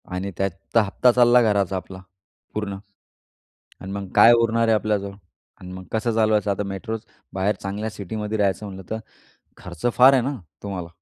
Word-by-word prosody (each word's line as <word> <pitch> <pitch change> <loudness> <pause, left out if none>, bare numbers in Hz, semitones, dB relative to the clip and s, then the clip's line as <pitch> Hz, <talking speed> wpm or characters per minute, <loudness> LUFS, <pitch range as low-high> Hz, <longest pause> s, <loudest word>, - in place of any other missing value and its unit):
आणि 95 +2 -3
त्याचा 95 +4 0
हप्ता 120 +5 +3
चालला 120 0 +5
घराचा 100 -4 +1
आपला 95 +1 -9 0.6
पूर्ण. 100 -2 -3 1.0
आणि 95 +1 -7
मग 100 -1 -5
काय 120 - +8
उरणार 115 0 +2
आहे 110 - +5
आपल्याजवळ? 105 -2 -1 0.5
आणि 90 0 -9
मग 95 0 -8
कसं 110 +1 0
चालवायचं 110 -2 +2
आता? 100 +1 -1
मेट्रोत 105 +3 -5 0.3
बाहेर, 95 +2 +1
चांगल्या 105 +3 -4
सिटीमध्ये 105 +2 -5
राहायचं 100 +1 0
म्हटलं 95 -2 -10
तर 110 - -2 0.6
खर्च 85 +4 -6
फार 130 +2 +8
आहे 130 - +3
ना 135 +2 -2 0.3
तुम्हाला. 95 -4 -5
105 Hz, 165 wpm, -23 LUFS, 95-110 Hz, 1.0 s, काय